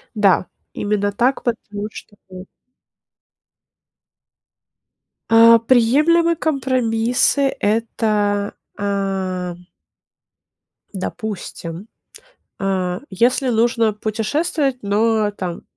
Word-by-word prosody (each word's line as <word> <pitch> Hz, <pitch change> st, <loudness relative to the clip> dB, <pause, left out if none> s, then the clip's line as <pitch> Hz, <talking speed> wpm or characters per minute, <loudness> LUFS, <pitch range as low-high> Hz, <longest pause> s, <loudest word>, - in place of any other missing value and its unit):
Да. 195 Hz, -4 st, +3 dB, 0.3 s
Именно 205 Hz, -1 st, -1 dB
так, 245 Hz, +6 st, 0 dB
потому 210 Hz, -3 st, -3 dB
что 205 Hz, -, -12 dB
поздно. 185 Hz, 0 st, -10 dB, 2.8 s
А, 230 Hz, 0 st, +8 dB
приемлемые 295 Hz, +9 st, +3 dB
компромиссы- 260 Hz, -2 st, +1 dB
это, 210 Hz, -2 st, 0 dB, 0.2 s
а 190 Hz, -3 st, -2 dB, 1.4 s
допустим, 190 Hz, -2 st, -6 dB, 0.7 s
а, 185 Hz, -2 st, -1 dB
если 245 Hz, +6 st, +1 dB
нужно 230 Hz, -1 st, +2 dB
путешествовать, 250 Hz, +7 st, -1 dB
но, 215 Hz, +1 st, +1 dB
там, 180 Hz, -4 st, -6 dB
215 Hz, 70 wpm, -19 LUFS, 200-240 Hz, 2.8 s, А